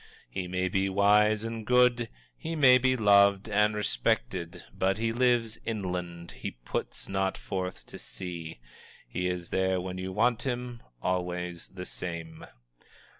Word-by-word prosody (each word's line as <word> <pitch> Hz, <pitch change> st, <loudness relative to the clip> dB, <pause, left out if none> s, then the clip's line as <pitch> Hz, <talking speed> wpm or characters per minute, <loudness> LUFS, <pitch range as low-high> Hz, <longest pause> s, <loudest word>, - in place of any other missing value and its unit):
He 95 Hz, -2 st, -3 dB
may 90 Hz, +1 st, 0 dB
be 95 Hz, +1 st, +1 dB
wise 105 Hz, +2 st, +4 dB
and 115 Hz, -1 st, -4 dB
good, 125 Hz, 0 st, +3 dB, 0.3 s
he 165 Hz, 0 st, -5 dB
may 130 Hz, -4 st, +7 dB
be 130 Hz, 0 st, +2 dB
loved 100 Hz, -2 st, +5 dB
and 105 Hz, 0 st, +2 dB
respected 85 Hz, -4 st, -1 dB
but 95 Hz, +1 st, +1 dB
he 115 Hz, +1 st, 0 dB
lives 120 Hz, -2 st, +2 dB
inland; 90 Hz, -5 st, -4 dB
he -, -, -5 dB, 0.2 s
puts -, -, -4 dB
not 95 Hz, 0 st, 0 dB
forth 95 Hz, -1 st, -4 dB
to -, -, -10 dB
sea. 85 Hz, -3 st, -6 dB, 0.5 s
He 90 Hz, 0 st, -2 dB
is 90 Hz, -1 st, -3 dB
there 95 Hz, 0 st, +1 dB
when 90 Hz, 0 st, -5 dB
you 95 Hz, +1 st, -4 dB
want 115 Hz, +4 st, +2 dB
him, 125 Hz, -2 st, -4 dB, 0.2 s
always 90 Hz, -1 st, -2 dB
the 90 Hz, -1 st, -8 dB
same. 85 Hz, -3 st, -6 dB
95 Hz, 145 wpm, -29 LUFS, 90-115 Hz, 0.5 s, may